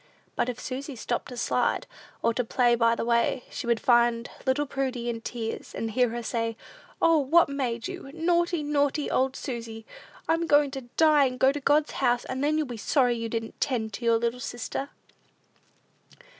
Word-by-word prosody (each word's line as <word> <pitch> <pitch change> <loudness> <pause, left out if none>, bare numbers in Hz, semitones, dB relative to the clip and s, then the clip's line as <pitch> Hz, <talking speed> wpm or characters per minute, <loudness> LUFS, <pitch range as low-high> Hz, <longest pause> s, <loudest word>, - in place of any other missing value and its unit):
But 245 - 0
if 250 0 -5
Susy 270 +2 -5
stopped 240 +1 -3
to 250 - -9
slide, - - 0 0.4
or 230 - +3
to 250 - 0
play 240 +1 +2
by 230 0 +3
the - - -3
way, 235 +1 +1
she 255 - -5
would 235 -1 +2
find 235 -1 +3 0.2
little 260 +3 +2
Prudy 260 -3 -2
in 230 -1 -6
tears, 225 -1 -5
and 225 0 -3
hear 250 +2 +2
her 235 +1 -4
say, 230 -1 -2 0.4
"O, 330 -1 +4
what 310 +4 +4
made 245 -5 -2
you? - - -7
Naughty, 340 0 +1
naughty 290 0 0
old 260 0 +1
Susy! 230 -3 -6 0.4
I'm 330 +1 +1
goin' 290 -2 +4
to 270 -1 -5 0.2
die, 305 -3 +5
and 255 -1 -2
go 265 - +5
to 290 - -4
God's 295 +2 +3
house, 240 0 +1
and 260 +1 -3
then 305 +1 +2
you'll 310 - +1
be 245 -3 -7
sorry 245 +2 +2
you 230 -1 -4
didn't 225 0 -5
'tend 225 -6 -1
to 240 - -6
your 230 0 +4
little 235 +2 -1
sister." 250 +2 -4
250 Hz, 190 wpm, -27 LUFS, 235-285 Hz, 0.4 s, die